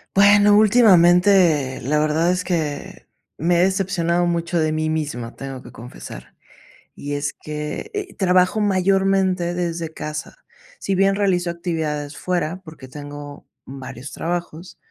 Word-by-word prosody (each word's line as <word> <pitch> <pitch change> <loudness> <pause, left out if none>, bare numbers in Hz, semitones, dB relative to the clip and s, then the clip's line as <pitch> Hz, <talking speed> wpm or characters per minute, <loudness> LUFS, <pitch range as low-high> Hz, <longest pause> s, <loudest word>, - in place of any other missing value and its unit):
Bueno, 205 +1 +6
últimamente, 180 - +4
la 150 +5 0
verdad 155 +3 +1
es 180 0 -1
que 160 -6 -4 0.3
me 175 +3 +1
he - - +5
decepcionado 180 -2 0
mucho 170 0 -1
de 155 -1 +1
mí 155 0 -1
misma, 145 -7 -4
tengo 135 -2 -8
que - - -12
confesar. 65 - -11 0.6
Y 145 0 -5
es 145 0 -3
que, 150 - -6
eh, 405 -2 -4
trabajo 185 +2 +2
mayormente 190 -2 +1
desde 170 -2 -3
casa. 155 - -6 0.4
Si 195 - -2
bien 195 +1 +3
realizo 185 -3 0
actividades 160 -4 -3
fuera, 180 0 -2
porque 155 -6 -12
tengo 145 +1 -10 0.2
varios 130 -1 -9
trabajos, 175 0 -5
170 Hz, 135 wpm, -21 LUFS, 150-185 Hz, 0.6 s, Bueno